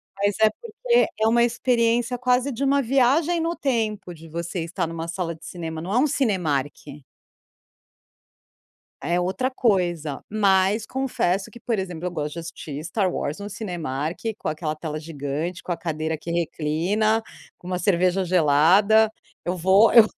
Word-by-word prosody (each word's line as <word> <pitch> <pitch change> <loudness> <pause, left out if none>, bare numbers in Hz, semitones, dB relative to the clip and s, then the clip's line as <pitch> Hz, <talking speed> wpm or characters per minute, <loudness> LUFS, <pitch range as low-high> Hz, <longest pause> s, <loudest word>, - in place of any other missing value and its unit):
Mas 200 0 0
é 220 - +7
porque 475 - 0
é 220 - +3
uma 235 +1 +4
experiência 240 0 +1
quase 250 +2 +1
de 255 +2 -3
uma 280 +1 +3
viagem 275 +7 +2
no 335 +1 -1
tempo, 215 - -2
de 165 0 -13
você 170 +2 -4
estar 170 +1 -3
numa 165 0 -5
sala 170 -1 -3
de 160 - -15
cinema. 160 -2 -6
Não 180 +4 -4
é - - +3
um 290 - +4
Cinemark. 175 - 0 2.3
É 175 +1 0
outra 190 +9 -1
coisa, 175 - 0
mas 200 0 +2
confesso 205 -8 -1
que 235 - -12
por 230 -1 -1
exemplo, 180 -3 -4
eu - - -4
gosto 150 -3 -3
de 170 - -6
assistir 155 -3 -7
Star 185 +3 0
Wars 145 +2 -3
no 205 - -6
Cinemark, 170 - -4 0.2
com - - -2
aquela 155 0 -3
tela 155 -1 -5
gigante, 155 +3 -4
com - - -6
a 170 - -1
cadeira 160 -1 -3
que 170 - -6
reclina, 170 +7 0 0.4
com 180 - -12
uma 180 0 -1
cerveja 185 0 +2
gelada. 185 +7 +4 0.3
Eu 180 - -1
vou 190 +5 +5
eu 230 -1 +10
185 Hz, 165 wpm, -24 LUFS, 165-230 Hz, 2.3 s, eu